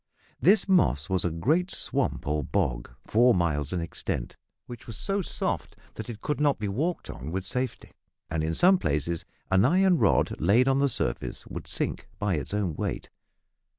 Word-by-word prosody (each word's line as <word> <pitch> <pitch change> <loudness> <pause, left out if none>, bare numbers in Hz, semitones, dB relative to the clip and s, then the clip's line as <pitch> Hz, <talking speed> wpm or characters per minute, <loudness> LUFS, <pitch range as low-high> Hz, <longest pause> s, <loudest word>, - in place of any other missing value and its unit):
This 200 +5 +4
moss 80 - +2
was 95 - +2
a 90 - +1
great 155 - +1
swamp - - 0
or 75 +1 0
bog, - - -1 0.2
four 120 +2 +4
miles 75 -5 0
in 90 - -1
extent, 80 -6 -4 0.3
which 120 0 -10
was 115 -4 -7
so 200 0 -1
soft - - -3 0.2
that - - -7
it 110 -2 -7
could 150 - -2
not 145 -2 +3
be 105 - -3
walked 155 - -2
on 65 +5 -7
with 90 +3 -3
safety, 125 +6 -3 0.4
and 80 -1 -2
in 80 +1 -1
some 185 +1 +5
places 75 +3 -1 0.3
an 95 +1 +5
iron 180 +5 +4
rod - - +2
laid 110 - +4
on 135 0 +3
the 140 0 +3
surface - - -3
would - - -7
sink - - -3
by 105 -2 0
its 75 -5 -3
own 100 -5 -1
weight. - - -4
105 Hz, 185 wpm, -27 LUFS, -, 0.4 s, some